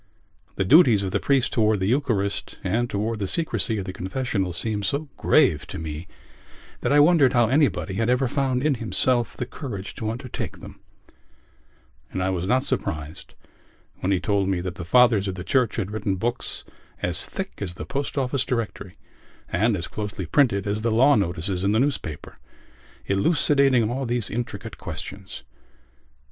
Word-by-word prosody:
The 95 - 0
duties 120 - +6
of 95 - -2
the - - +1
priest 135 -3 +1
towards 110 -2 +2
the 95 - 0
Eucharist 110 -5 -1
and 120 +6 0
towards 110 +2 -2
the 100 - -2
secrecy 130 - 0
of 95 - -3
the 95 - -5
confessional 95 -1 -2
seemed 105 +4 -1
so 140 +10 -2
grave 95 - +3
to - - -7
me 80 +2 -6 0.7
that - - -1
I 145 - +6
wondered 145 -4 +5
how 120 -2 +3
anybody 135 -7 +1
had 115 +4 0
ever 125 +1 +2
found 130 -1 0
in 150 -1 +3
himself 120 +1 +1
the 125 - -2
courage 105 -8 -7
to 110 - -2
undertake 120 +2 -5
them; - - -12 1.3
and 95 - -2
I 95 - 0
was 90 0 -2
not 130 +4 +2
surprised 75 0 -4 0.6
when 95 - -1
he 95 - +2
told 100 +1 0
me 95 -2 0
that 90 -1 -4
the 90 - -7
fathers 115 0 +4
of 95 - -3
the 90 - -6
Church 125 +1 +1
had 100 -3 -3
written 105 -2 -1
books 120 +6 -3 0.4
as - - +3
thick - - -6
as 90 -3 -3
the - - -6
Post 140 +1 -4
Office 130 -1 +1
Directory 110 -7 -4 0.5
and 105 +4 +1
as 85 - -3
closely 105 -3 -5
printed 100 - +2
as 105 +1 -1
the 115 - 0
law 130 +6 +5
notices 90 - -1
in 100 +1 +2
the 110 - +3
newspaper, 130 - -3 0.7
elucidating 135 - +3
all 130 +1 -2
these 120 -3 -1
intricate 120 +1 -5
questions. 95 -2 -6
110 Hz, 175 wpm, -24 LUFS, 95-130 Hz, 1.3 s, duties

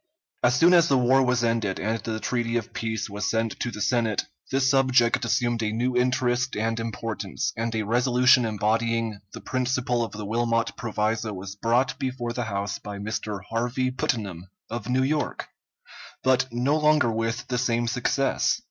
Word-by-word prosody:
As 120 0 +3
soon 170 +7 +5
as 170 -2 +6
the 135 - +3
war 130 +2 +4
was 125 -2 +2
ended 115 -4 0
and 110 +2 -1
the 110 -1 -4
treaty 120 0 -1
of 115 - -5
peace 110 -1 -3
was 100 0 -3
sent 115 0 -1
to 125 - -1
the 105 -2 -7
Senate, 110 -1 +1 0.2
this 135 0 +2
subject 130 -4 +3
assumed 120 -1 0
a 110 -1 0
new 120 +3 -1
interest 125 0 +1
and 115 +2 -1
importance, 115 0 -3
and 115 0 -2
a 110 - 0
resolution 125 +3 +4
embodying 115 0 0
the - - -8
principle 125 -1 0
of 115 - -6
the 105 0 -6
Wilmot 115 +1 0
proviso 110 -1 -1
was 95 +1 -7
brought 120 +4 +1
before 125 -3 -3
the 125 -1 -2
House 100 -1 -3
by 105 -1 -7
Mr. 105 -1 -4
Harvey 120 +3 -1
Putnam, 100 -8 -3 0.2
of 120 0 -5
New 130 +1 +2
York, 150 +2 -1 0.7
but 130 -1 +3
no 125 +5 +1
longer 150 -5 +3
with 115 +1 -2
the 125 -1 0
same 120 -1 0
success. 130 - +1
115 Hz, 175 wpm, -25 LUFS, 110-125 Hz, 0.7 s, as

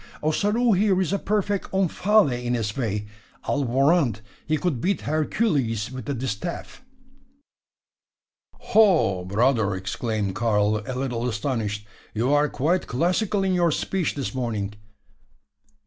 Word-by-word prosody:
Ossaroo 210 +10 +2
here 195 0 +3
is 190 0 0
a 200 - +1
perfect 205 -1 -1
Omphale 195 -1 +3
in 120 0 0
his 110 -3 -2
way. 105 -5 -2 0.4
I'll 145 - 0
warrant 135 - +2 0.3
he 155 0 +1
could 150 -8 -1
beat 195 +6 0
Hercules 145 - 0
with 130 -3 -7
the 140 - -2
distaff." 130 - -5 1.7
"Ho! 175 - +3
brother!" 110 0 +1
exclaimed 100 +1 -2
Karl, 105 -1 +1
a 130 - -3
little 125 -2 -2
astonished. 105 -2 -2 0.3
"You 120 +6 +1
are 145 0 +3
quite 165 +7 0
classical 185 - 0
in 190 -1 +1
your 175 -1 +3
speech 185 +3 -1
this 140 -2 -3
morning. 110 -6 -3
135 Hz, 130 wpm, -24 LUFS, 110-180 Hz, 1.7 s, here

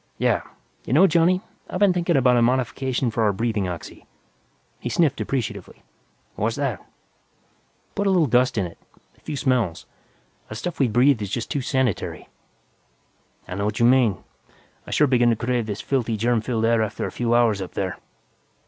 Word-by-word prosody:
"Yeah. - - +1 0.4
You - - -3
know, 170 +7 +7
Johnny, 175 +1 +3 0.3
I've - - -3
been 200 -2 +4
thinking 175 -2 +1
about 125 -1 +4
a 120 - +3
modification 130 0 0
for 115 - -2
our 105 -2 +3
breathing 110 -1 -1
oxy." 85 -2 -8 0.7
He - - -4
sniffed 155 -5 +1
appreciatively. 130 -5 -4 0.5
"What's 110 +2 -1
that?" 135 -9 -2 1.1
"Put 200 0 -1
a - - +4
little 180 -4 +4
dust 125 -1 +2
in 95 - +1
it, 85 - -10 0.4
a - - -27
few 150 - -5
smells. 120 - 0 0.6
That 110 - -7
stuff 175 +9 -5
we 135 - +4
breathe 120 +1 +3
is 100 - -3
just 110 +3 -4
too 140 - -1
sanitary!" 130 -5 -2 1.2
"I 90 - -6
know 100 +2 -2
what 105 - -2
you 115 - +4
mean. 120 -7 +3 0.6
I - - -8
sure 150 - +3
begin 120 -3 +3
to 115 - +3
crave 120 0 -1
this 105 -1 -4
filthy, 120 -5 -1
germ 115 +1 +1
filled 115 -1 -1
air 115 0 +3
after 110 - -2
a - - -4
few 120 -1 0
hours 115 -4 +3
out 95 - -7
there." 95 -2 -3
120 Hz, 185 wpm, -23 LUFS, 110-135 Hz, 1.2 s, know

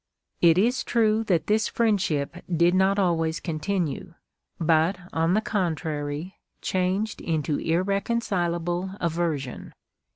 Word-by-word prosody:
^ - - -59 0.2
" - - -49
It 165 - +4
is 245 +7 +2
true 220 -1 +2
that 175 -6 +1
this 215 +1 +2
friendship 180 -9 0
did 170 +1 +3
not 190 +1 +3
always 165 -4 +1
continue, 170 0 -3 0.4
but, 165 +2 +3 0.2
on 165 +3 +2
the 215 - +3
contrary, 160 -4 -3 0.2
changed 190 +4 -1
into 155 -2 -1
irreconcilable 185 -1 -1
aversion. 160 -6 -2
175 Hz, 120 wpm, -25 LUFS, 160-200 Hz, 0.4 s, It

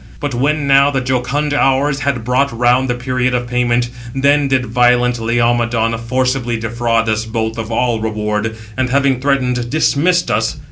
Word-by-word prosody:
685 145 -1 -4
But 120 +1 -2
when 150 0 0
now 140 +1 +5
the 135 -2 -1
jocund 130 +4 -1
Hours 135 0 +1
had 140 -5 -2
brought 130 +4 +1
round 125 +2 +1
the 120 - 0
period 125 0 -1
of 120 0 -2
payment, 120 0 0 0.2
then 140 +1 +2
did 130 -2 +1
violent 125 0 +2
Laomedon 115 0 +1
forcibly 125 0 -1
defraud 115 0 -1
us 110 0 0
both 110 0 -3
of 115 0 -5
all 120 0 0
reward, 110 0 -2 0.2
and 130 -1 -1
having 135 -1 +1
threatened, 125 -3 0
dismissed 160 +4 +1
us. - - -1
125 Hz, 170 wpm, -16 LUFS, 115-135 Hz, 0.2 s, now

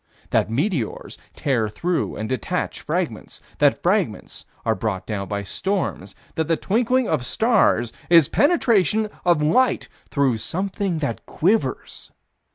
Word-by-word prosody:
That - - +2
meteors 140 - -2 0.2
tear 120 -7 0
through 175 +10 -2
and 110 - -4
detach 125 -2 -2
fragments? - - -3 0.2
That - - +3
fragments - - -1 0.2
are 115 - +3
brought 110 -4 -3
down 100 -3 -4
by 100 -1 -3
storms? 170 - -3 0.2
That 160 -1 -1
the 165 -1 +2
twinkling 245 +4 +1
of 150 -6 0
stars 220 - +2 0.2
is 165 -5 +7
penetration 220 - +2
of 170 -4 +3
light 250 +12 +2 0.2
through 135 -5 +1
something 190 - -2
that 115 - -4
quivers? 205 +7 -1
160 Hz, 130 wpm, -22 LUFS, -, 0.2 s, is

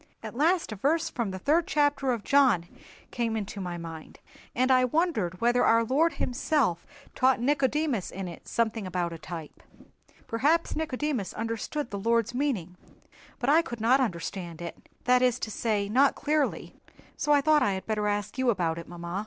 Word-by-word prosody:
At - - -6
last 325 +4 +2
a - - -4
verse 320 - 0
from 235 -4 -2
the 190 - -5
third 310 - +2
chapter 285 -2 +1
of 235 -4 -2
John 260 -11 +4 0.5
came 230 -2 -1
into 205 -1 -5
my 175 -2 -4
mind, 165 -2 -9 0.4
and 255 +2 +2
I 255 -1 +5
wondered 250 - 0
whether 240 +1 +3
our 230 0 +4
Lord 295 +8 +2
Himself 245 - 0 0.3
taught 260 -1 +3
Nicodemus 275 - 0
in 190 -1 -6
it 170 - -10
something 220 -3 -1
about 175 -2 -2
a 165 - -8
type. 160 -1 -8 0.6
Perhaps 295 +9 +1
Nicodemus 295 - -2
understood 230 +5 -3
the 200 - -4
Lord's 230 +2 +1
meaning, 225 - -2 0.6
but 245 - -3
I 320 +3 +6
could 235 -8 -7
not 240 +5 +4
understand 175 -5 -4
it—that 245 +8 -1
is 250 -1 +3
to 220 - -5
say, 210 -2 -1
not 265 +7 +3
clearly—so 295 0 -3
I 290 -1 +5
thought 305 +1 +4
that - - +2
I 200 - +1
had 190 - -5
better 210 -1 -1
ask 205 +3 -2
you 260 -1 +2
about 170 -6 0
it, 170 - -9
mamma." 175 +2 -5
235 Hz, 180 wpm, -28 LUFS, 190-280 Hz, 0.6 s, I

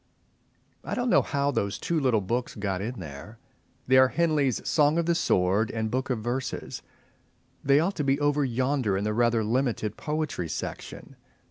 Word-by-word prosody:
X. - - -14
I - - 0
don't 245 -1 0
know - - +6
how 140 -1 -1
those 100 -7 -1
two 170 -2 -1
little 125 -7 +2
books 120 +6 -2
got 100 -3 -2
in 115 +2 -4
there. 80 +6 -9 0.5
They 130 +1 +4
are 130 0 +7
Henley's 150 -5 0
"Song 150 +1 +3
of 170 - +1
the 170 - +2
Sword" 100 - +1
and 110 -1 -3
"Book 130 +2 -2
of 125 - 0
Verses." 125 +2 -4 0.8
They 140 +1 +4
ought 180 +5 0
to 150 - 0
be 140 0 +1
over 145 0 +2
yonder 130 -4 0
in 100 - -2
the 105 0 -1
rather 115 0 +2
limited 115 -2 -1
Poetry 150 - -3
Section. - - -7
130 Hz, 185 wpm, -27 LUFS, 105-145 Hz, 0.8 s, are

